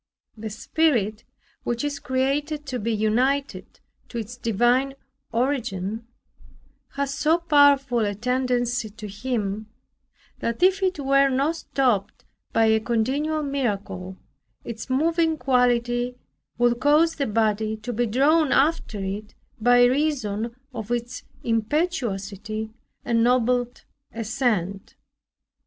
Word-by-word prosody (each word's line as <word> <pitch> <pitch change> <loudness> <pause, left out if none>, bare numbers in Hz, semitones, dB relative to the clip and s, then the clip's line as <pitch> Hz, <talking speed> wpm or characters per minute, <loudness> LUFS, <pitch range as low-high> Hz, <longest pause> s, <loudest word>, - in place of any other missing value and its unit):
The 220 0 -6
spirit 220 -3 0 0.4
which 240 +2 -2
is 290 -1 -2
created 285 +4 -1
to 255 -3 -3
be 230 +2 -1
united 245 +6 0 0.3
to 240 - -6
its 230 +2 -5
divine 245 +4 +1 0.4
Origin, 230 -4 -2 0.9
has 280 0 -2
so 315 +4 +2
powerful 285 -6 +4
a 205 -2 0
tendency 245 0 0
to 210 +1 -9
Him, 210 -1 -3 0.7
that 230 +9 -2
if 380 +1 +4
it 375 -3 +1
were 275 0 +4
not 280 +5 +1
stopped 245 -10 -1 0.3
by 225 - +3
a 220 0 +4
continual 270 +8 0
miracle, 200 -9 -3 0.5
its 230 +2 -7
moving 320 +4 +2
quality 245 -1 +1 0.4
would 240 0 +2
cause 300 +5 +3
the 280 - 0
body 220 0 0
to 215 +3 -5
be 240 +2 0
drawn 285 +6 +3
after 270 -8 +1
it 205 +2 -5 0.2
by 245 +2 +5
reason 245 -5 0 0.2
of 220 -2 -6
its 240 +1 -3 0.2
impetuosity 220 - -2 0.3
and 230 -1 +2
noble 245 0 +2 0.4
assent. 215 -5 -2
245 Hz, 115 wpm, -24 LUFS, 220-275 Hz, 0.9 s, by